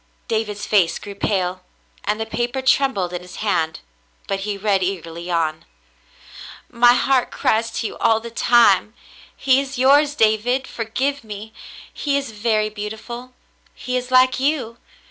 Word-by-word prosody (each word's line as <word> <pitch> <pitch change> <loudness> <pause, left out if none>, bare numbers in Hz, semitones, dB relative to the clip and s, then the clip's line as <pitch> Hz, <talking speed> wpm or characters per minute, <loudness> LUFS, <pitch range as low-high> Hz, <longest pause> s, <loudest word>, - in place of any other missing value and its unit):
David's 215 -2 -2
face 195 -6 +2
grew 200 - -9
pale, 185 -2 -1 0.4
and 210 +1 0
the 220 - -2
paper 240 +4 -3
trem 270 +1 +3
bled 180 -2 -2
in 175 - -4
his 180 0 -12
hand, 165 -7 -1 0.4
but 195 -1 -2
he 205 +1 -3
read 200 -1 +1
eagerly 170 -2 -4
on. 160 -2 -1 0.6
" - - -15 0.2
My 240 - +8
heart 260 0 +2
cries 225 +1 0
to - - -3
you - - -5
all 225 -1 +3
the 230 +1 -9
time. 230 -2 +4 0.4
He 265 -1 +3
is 275 -1 -7
yours, 285 +3 +4
David; 225 +3 +2
forgive 260 +5 -3
me. 215 0 -9 0.4
He 285 -1 0
is 275 -4 -4
very 215 0 0
beautiful. 220 +4 -7 0.4
He 250 - -4
is 250 0 -2
like 255 0 +4
you. 265 -5 -1
220 Hz, 160 wpm, -21 LUFS, 200-255 Hz, 0.6 s, My